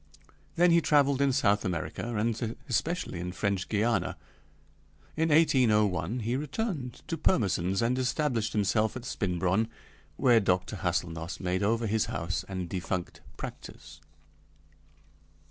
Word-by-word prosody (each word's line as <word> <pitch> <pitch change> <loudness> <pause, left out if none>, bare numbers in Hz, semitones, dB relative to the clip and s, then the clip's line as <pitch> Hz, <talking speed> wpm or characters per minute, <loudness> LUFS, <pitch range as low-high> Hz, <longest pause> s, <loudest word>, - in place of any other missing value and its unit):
Then 175 +1 +5
he 170 0 +5
traveled 140 -3 +3
in 140 -1 +3
South 105 -6 +2
America, 95 +5 -3
and 115 +1 -1
especially 150 - -1
in 90 +1 -4
French 100 -1 -1
Guiana. 110 +2 0 1.0
In 160 +1 +1
1801 120 - +3
he 115 +3 -1
returned 145 - -3
to 165 - -3
Pirmesens, 95 - +1
and 125 +2 +1
established 125 -4 0
himself 110 +1 +1
at 125 -1 -7
Spinbronn, 95 0 0 0.5
where 120 -3 +5
Dr. 95 +1 0
Hâselnoss 85 -1 -2
made 90 0 -1
over 115 +3 +1
his 110 0 +1
house 85 +2 -3
and 95 -2 -4
defunct 90 0 -4 0.2
practice. 80 +1 -9
110 Hz, 125 wpm, -29 LUFS, 95-130 Hz, 1.0 s, Then